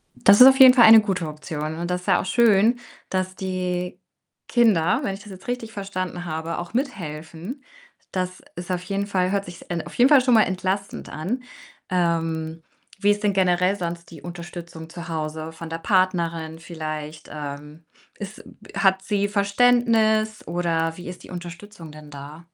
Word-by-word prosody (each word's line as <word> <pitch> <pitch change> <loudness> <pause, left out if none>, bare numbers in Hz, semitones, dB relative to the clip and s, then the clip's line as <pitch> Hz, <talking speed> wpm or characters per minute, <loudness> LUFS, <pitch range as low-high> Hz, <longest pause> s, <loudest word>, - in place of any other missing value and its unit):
Das 200 +3 +6
ist 255 - +12
auf 265 +1 +6
jeden 260 -1 +10
Fall 240 -3 +7
eine 220 0 +9
gute 185 -6 -2
Option 155 0 -5
und 175 +1 -4
das 180 0 -1
ist - - -16
ja 190 - +4
auch - - -7
schön, 230 +2 +4 0.3
dass 185 0 -2
die 180 -1 -3 0.5
Kinder, 215 -9 +3
wenn 195 - -1
ich 195 - -9
das 210 - -13
jetzt 185 0 -12
richtig 245 -2 -4
verstanden 185 -3 -5
habe, 160 0 -4
auch 175 +4 -6
mithelfen. 180 - -5 0.5
Das 185 0 -3
ist 175 +1 -6
auf 180 -1 -1
jeden 200 +2 -2
Fall 185 -2 0
hört 200 0 0
sich's 175 0 -10
en 170 -2 -4
auf - - -10
jeden 250 +3 +5
Fall 285 -3 +7
schon 250 -1 +2
mal 220 -2 +7
entlastend 190 +1 -3
an. 215 +12 -4 0.5
Ähm, 165 -2 -1 0.4
wie 205 0 +4
ist 205 +1 -1
denn 205 -1 +2
generell 180 0 +2
sonst 170 -1 -5
die 160 - -11
Unterstützung 170 -2 -9
zu 170 0 -8
Hause 155 -1 -4
von 165 0 -9
der 165 - -3
Partnerin 170 -3 0
vielleicht? 155 -1 -7
Ähm, 150 +2 -8 0.3
ist 205 0 -8
m - - -15 0.2
hat 190 -1 +3
sie 205 0 0
Verständnis 220 +1 +2
oder 165 -1 -1
wie 180 - -9
ist 180 - -9
die - - -14
Unterstützung 175 -1 -9
denn 150 0 -13
da? 145 +4 -10
180 Hz, 180 wpm, -23 LUFS, 165-205 Hz, 0.5 s, ist